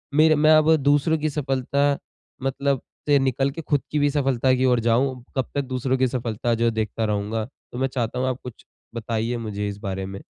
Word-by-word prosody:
मेरे 155 Hz, 0 st, +6 dB
मैं 155 Hz, +1 st, +4 dB
अब 155 Hz, +1 st, +5 dB
दूसरों 145 Hz, +2 st, +2 dB
की 155 Hz, 0 st, -1 dB
सफलता 135 Hz, -1 st, -2 dB, 0.6 s
मतलब 135 Hz, 0 st, 0 dB, 0.3 s
से 145 Hz, -1 st, +5 dB
निकल 135 Hz, +1 st, +1 dB
के 165 Hz, -, -6 dB
खुद 145 Hz, -2 st, 0 dB
की 150 Hz, -, +1 dB
भी 145 Hz, 0 st, +3 dB
सफलता 135 Hz, -3 st, +2 dB
की 130 Hz, +1 st, +1 dB
ओर 125 Hz, -2 st, +3 dB
जाऊँ, 125 Hz, +2 st, +1 dB
कब 130 Hz, -, +1 dB
तक 140 Hz, -, +2 dB
दूसरों 130 Hz, 0 st, -1 dB
की 130 Hz, 0 st, +3 dB
सफलता 120 Hz, -2 st, -2 dB
जो 115 Hz, +1 st, 0 dB
है 115 Hz, -, +3 dB
देखता 110 Hz, 0 st, -2 dB
रहूँगा? 105 Hz, +1 st, -1 dB
तो 125 Hz, -1 st, -14 dB
मैं 135 Hz, +1 st, +1 dB
चाहता 125 Hz, -1 st, -3 dB
हूँ 130 Hz, -, 0 dB
आप 130 Hz, -, -3 dB
कुछ 125 Hz, -3 st, -10 dB, 0.3 s
बताइए 115 Hz, +1 st, -2 dB
मुझे 105 Hz, -2 st, -4 dB
इस 100 Hz, -, -6 dB
बारे 95 Hz, -2 st, -4 dB
में। 95 Hz, +1 st, -7 dB
130 Hz, 215 wpm, -23 LUFS, 115-140 Hz, 0.6 s, मेरे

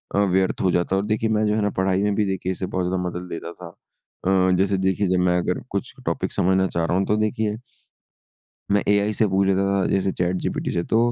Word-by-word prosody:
अ, 100 Hz, 0 st, +3 dB
व्यर्थ 95 Hz, 0 st, +1 dB
हो 95 Hz, -, +2 dB
जाता 90 Hz, +2 st, +1 dB
और 100 Hz, +1 st, 0 dB
देखिए 110 Hz, +1 st, 0 dB
मैं 110 Hz, 0 st, +2 dB
जो 105 Hz, -, +1 dB
है 110 Hz, -, +1 dB
ना 105 Hz, -, +1 dB
पढ़ाई 95 Hz, +1 st, +1 dB
में 105 Hz, -1 st, +1 dB
भी 105 Hz, -, +1 dB
देखिए 95 Hz, -1 st, -2 dB
इसे 95 Hz, 0 st, -3 dB
बहुत 90 Hz, -1 st, -2 dB
ज़्यादा 90 Hz, 0 st, -1 dB
मदद 90 Hz, +1 st, -7 dB
लेता 85 Hz, +1 st, -6 dB
था। 90 Hz, -2 st, -10 dB, 0.6 s
अ, 95 Hz, -1 st, +3 dB
जैसे 95 Hz, 0 st, +2 dB
देखिए 95 Hz, +1 st, +1 dB
जब 90 Hz, 0 st, +2 dB
मैं 90 Hz, 0 st, +3 dB
अगर -, -, -1 dB
कुछ -, -, -3 dB
टॉपिक -, -, -1 dB
समझना 95 Hz, +1 st, +2 dB
चाह 85 Hz, -1 st, -1 dB
रहा 90 Hz, +3 st, 0 dB
हूँ 95 Hz, -, +1 dB
तो 105 Hz, -, +2 dB
देखिए 110 Hz, 0 st, 0 dB, 1.2 s
मैं 100 Hz, 0 st, +3 dB
एआई 105 Hz, +1 st, +3 dB
से 110 Hz, -, +2 dB
पूछ 95 Hz, +1 st, +2 dB
लेता 95 Hz, 0 st, +2 dB
था, 100 Hz, -1 st, +1 dB
जैसे 95 Hz, -1 st, +1 dB
चैटजीपीटी 90 Hz, +1 st, -2 dB
से, 85 Hz, -, -1 dB
तो 115 Hz, -, +1 dB
95 Hz, 240 wpm, -23 LUFS, 90-100 Hz, 1.2 s, अ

